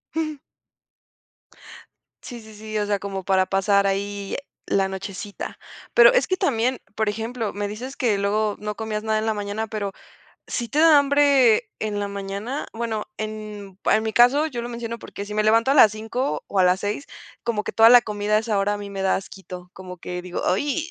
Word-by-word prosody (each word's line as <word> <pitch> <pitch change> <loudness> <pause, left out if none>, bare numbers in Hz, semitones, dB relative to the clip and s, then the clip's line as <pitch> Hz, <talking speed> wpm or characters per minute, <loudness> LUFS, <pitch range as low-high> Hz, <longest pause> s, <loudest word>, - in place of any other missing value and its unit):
Ujú. 310 -2 -2 1.9
Sí, 240 -1 -8
sí, 220 -1 -14
sí, 215 0 -5
o 210 - 0
sea, 205 -1 0
como 195 -1 -5
para 190 0 +3
pasar 200 +1 +2
ahí 200 0 -2 0.3
la 195 -1 +1
nochecita. 195 +1 -7 0.3
Pero, - - +8
es - - +3
que 370 - -1
también, 255 - 0 0.2
por 220 -1 +1
ejemplo, 225 +1 -3
me 205 0 -3
dices 250 +6 -7
que 220 -5 +1
luego 210 +1 0
no 210 0 -4
comías 215 0 -4
nada 220 -1 +1
en 220 - -2
la 220 - +1
mañana, 205 +2 -3
pero 210 -2 -3 0.6
¿sí 235 -2 -3
te 290 - -2
da 320 -2 +7
hambre 280 -4 +4
en 210 -1 -2
la 205 0 -2
mañana? 200 +7 -5
Bueno, 225 -2 -3
pa 215 - -3
en 210 -3 -8
en 220 - +4
mi 220 0 -2
caso, 250 +7 +5
yo 245 -5 -5
lo 235 - -5
menciono 235 -1 -5
porque 200 - -8
si 210 - -8
me 215 0 +1
levanto 230 +4 +4
a 275 - +4
las 220 -7 +7
5 225 +5 -3
o 200 - -2
a 185 - +5
las 180 +1 +3
6, 210 +7 -3 0.4
como 230 -3 -1
que - - -4
toda 225 0 +7
la 245 -1 +8
comida 210 0 -2
a - - +5
esa 220 -2 -1
hora 200 +1 +1
a - - -5
mí 205 -1 -7
me 195 -1 -5
da 190 0 +2
asquito. 185 -2 -9
Como 185 -1 -9
que 180 0 -6
digo: 180 0 -5
"¡Ay!", 295 - 0
215 Hz, 210 wpm, -23 LUFS, 200-235 Hz, 1.9 s, Pero